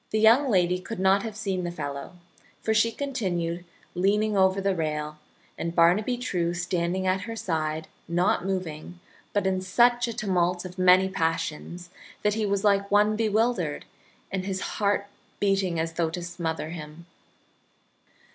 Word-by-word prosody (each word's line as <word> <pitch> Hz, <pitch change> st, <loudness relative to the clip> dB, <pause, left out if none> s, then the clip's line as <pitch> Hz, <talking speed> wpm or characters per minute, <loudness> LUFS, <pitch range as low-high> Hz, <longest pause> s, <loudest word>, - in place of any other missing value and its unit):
The 215 Hz, -, 0 dB
young 235 Hz, +6 st, +5 dB
lady 180 Hz, -3 st, +2 dB
could 185 Hz, +3 st, -7 dB
not 190 Hz, +1 st, +4 dB
have 220 Hz, -1 st, -6 dB
seen 195 Hz, -4 st, -2 dB
the 175 Hz, -, -2 dB
fellow, 145 Hz, -2 st, -6 dB, 0.5 s
for 220 Hz, -, +1 dB
she 225 Hz, +1 st, +3 dB
continued 180 Hz, -11 st, -2 dB, 0.3 s
leaning 205 Hz, +4 st, +1 dB
over 190 Hz, 0 st, +3 dB
the 195 Hz, 0 st, +1 dB
rail, 150 Hz, -2 st, -3 dB, 0.4 s
and 170 Hz, +1 st, -3 dB
Barnaby 185 Hz, +9 st, +4 dB
True, 175 Hz, -8 st, -1 dB
standing 175 Hz, +1 st, -1 dB
at 185 Hz, +1 st, 0 dB
her 225 Hz, -, -4 dB
side, 160 Hz, -5 st, -2 dB, 0.2 s
not 175 Hz, +1 st, +1 dB
moving, 180 Hz, -3 st, -4 dB, 0.3 s
but 205 Hz, -1 st, 0 dB
in 190 Hz, -1 st, +1 dB
such 240 Hz, +6 st, +3 dB
a 235 Hz, -, -3 dB
tumult 180 Hz, -2 st, 0 dB
of 185 Hz, +1 st, -9 dB
many 185 Hz, +1 st, +6 dB
passions 170 Hz, 0 st, -3 dB, 0.3 s
that 210 Hz, 0 st, +3 dB
he 215 Hz, -1 st, -1 dB
was 200 Hz, 0 st, 0 dB
like 200 Hz, -1 st, +3 dB
one 210 Hz, +1 st, +4 dB
bewildered, 215 Hz, -7 st, 0 dB, 0.5 s
and 190 Hz, -1 st, -2 dB
his 190 Hz, -1 st, -3 dB, 0.2 s
heart 200 Hz, 0 st, +2 dB, 0.3 s
beating 195 Hz, -4 st, +1 dB
as 165 Hz, 0 st, -2 dB
though 165 Hz, -1 st, 0 dB
to 175 Hz, +2 st, -5 dB
smother 165 Hz, -2 st, -3 dB
him. 155 Hz, 0 st, -9 dB
185 Hz, 155 wpm, -26 LUFS, 170-205 Hz, 0.5 s, many